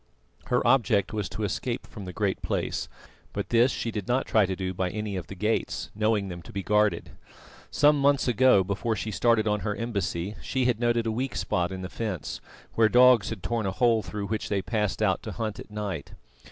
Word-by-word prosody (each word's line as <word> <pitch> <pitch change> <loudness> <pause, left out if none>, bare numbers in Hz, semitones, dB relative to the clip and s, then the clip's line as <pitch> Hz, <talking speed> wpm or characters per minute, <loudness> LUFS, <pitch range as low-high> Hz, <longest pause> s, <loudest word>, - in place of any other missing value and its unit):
Her 125 - +1
object 115 -7 +3
was 105 -4 -2
to 110 - -5
escape 115 +5 -2
from 105 -4 -9
the 90 - -6
Great 100 +1 -1
Place, - - -2 0.4
but - - -3
this 120 +2 +4
she 115 - -3
did 105 -3 -5
not 125 +2 +1
try 110 -4 +3
to 95 - -2
do 95 0 -3
by 90 0 -1
any 105 +1 -4
of 90 -4 -5
the 95 - -8
gates, 105 +4 -1
knowing 105 -1 +1
them 90 -2 -7
to 80 - -12
be 100 0 -4
guarded. 105 +1 +1 0.6
Some 150 0 +4
months 140 -1 +3
ago, 125 -4 +5
before 105 +4 -1
she 110 +1 -4
started 110 +3 +2
on 105 0 +1
her 105 0 -2
embassy, 100 -5 -2
she 130 -1 -1
had 120 -3 +1
noted 120 -1 +1
a 110 - 0
weak 130 +4 -3
spot 90 0 -1
in 95 0 -5
the - - -3
fence, 100 -6 -4 0.3
where 110 -1 +4
dogs 125 -3 +6
had 110 -5 -6
torn 115 -4 -1
a - - 0
hole 115 +1 +3
through 105 -1 -5
which 105 +1 -3
they 100 -2 0
passed 105 0 -1
out 95 -3 +2
to 110 - -6
hunt 110 -2 -4
at - - -10
night. 105 -4 -5
105 Hz, 220 wpm, -27 LUFS, 100-115 Hz, 0.6 s, dogs